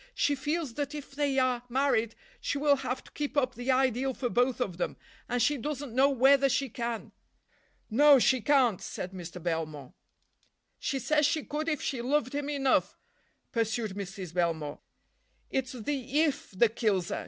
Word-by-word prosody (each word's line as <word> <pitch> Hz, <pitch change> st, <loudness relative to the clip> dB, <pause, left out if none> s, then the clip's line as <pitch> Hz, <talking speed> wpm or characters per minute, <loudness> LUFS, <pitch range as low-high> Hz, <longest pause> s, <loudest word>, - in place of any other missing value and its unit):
She 290 Hz, -, +2 dB
feels 295 Hz, 0 st, -2 dB
that 290 Hz, +3 st, -3 dB
if 290 Hz, -1 st, -8 dB
they 280 Hz, -1 st, 0 dB
are 255 Hz, -2 st, +2 dB
married 240 Hz, -3 st, +1 dB, 0.2 s
she -, -, -2 dB
will 285 Hz, 0 st, +3 dB
have 260 Hz, -1 st, -3 dB
to -, -, -17 dB
keep 295 Hz, 0 st, -4 dB
up 255 Hz, -2 st, +2 dB
the 245 Hz, +2 st, -6 dB
ideal 260 Hz, 0 st, +2 dB
for 245 Hz, -, -2 dB
both 245 Hz, +2 st, +1 dB
of 195 Hz, -9 st, -2 dB
them, 175 Hz, -, -2 dB, 0.3 s
and 245 Hz, -, 0 dB
she 290 Hz, +4 st, +2 dB
doesn't 280 Hz, -1 st, -4 dB
know 265 Hz, +3 st, +5 dB
whether 275 Hz, +1 st, +5 dB
she 270 Hz, +1 st, 0 dB
can." 235 Hz, 0 st, -4 dB, 0.8 s
"No, 285 Hz, +5 st, +6 dB
she 260 Hz, 0 st, +3 dB
can't," 255 Hz, -7 st, +3 dB
said 180 Hz, -, -5 dB
Mr. 180 Hz, -1 st, -8 dB
Belmore. 155 Hz, -5 st, -4 dB, 0.9 s
"She 275 Hz, -, -1 dB
says 300 Hz, +2 st, +2 dB
she 310 Hz, -1 st, 0 dB
could 305 Hz, +2 st, -3 dB
if 305 Hz, -, -2 dB
she 260 Hz, -4 st, -2 dB
loved 255 Hz, 0 st, 0 dB
him 290 Hz, 0 st, -2 dB
enough," 275 Hz, -3 st, +1 dB, 0.5 s
pursued 225 Hz, -1 st, -1 dB
Mrs. 190 Hz, -3 st, -6 dB
Belmore. 165 Hz, -4 st, -1 dB, 0.7 s
"It's 265 Hz, -1 st, -1 dB
the 270 Hz, +3 st, -2 dB
if 295 Hz, -3 st, +1 dB
that 220 Hz, +3 st, +2 dB
kills 195 Hz, -7 st, +1 dB
her. -, -, -2 dB
255 Hz, 175 wpm, -29 LUFS, 225-285 Hz, 0.9 s, No